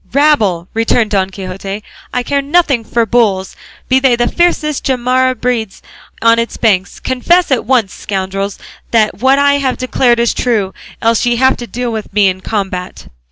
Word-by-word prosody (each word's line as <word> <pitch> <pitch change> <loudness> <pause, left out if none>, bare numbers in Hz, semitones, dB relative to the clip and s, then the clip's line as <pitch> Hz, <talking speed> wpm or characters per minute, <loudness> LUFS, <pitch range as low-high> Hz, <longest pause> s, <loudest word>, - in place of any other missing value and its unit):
"Rabble!" 220 - +2
returned 225 0 +1
Don 195 -2 +1
Quixote, 195 +2 -6 0.3
"I 250 - -1
care 280 +3 0
nothing 285 -4 +1
for 230 +1 0
bulls, 205 -4 +1 0.3
be 260 0 +3
they 260 -2 +3
the 240 0 0
fiercest 310 -4 0
Jarama 255 0 +1
breeds 230 -5 -2 0.4
on 230 0 +5
its 230 - -3
banks. 195 -4 0
Confess 340 +7 +1
at 260 - +1
once, 235 -5 +1
scoundrels, 195 0 -4 0.3
that 215 -3 +1
what 265 +3 +3
I 285 0 +3
have 265 -2 -1
declared 245 -1 +1
is 235 0 +2
true; 210 -6 -1 0.3
else 230 0 +2
ye 240 - +2
have 260 +2 +3
to 240 - -7
deal 245 0 -3
with 220 -2 -5
me 200 -1 +4
in 185 0 -5
combat." 190 -3 -4
235 Hz, 170 wpm, -14 LUFS, 200-260 Hz, 0.4 s, on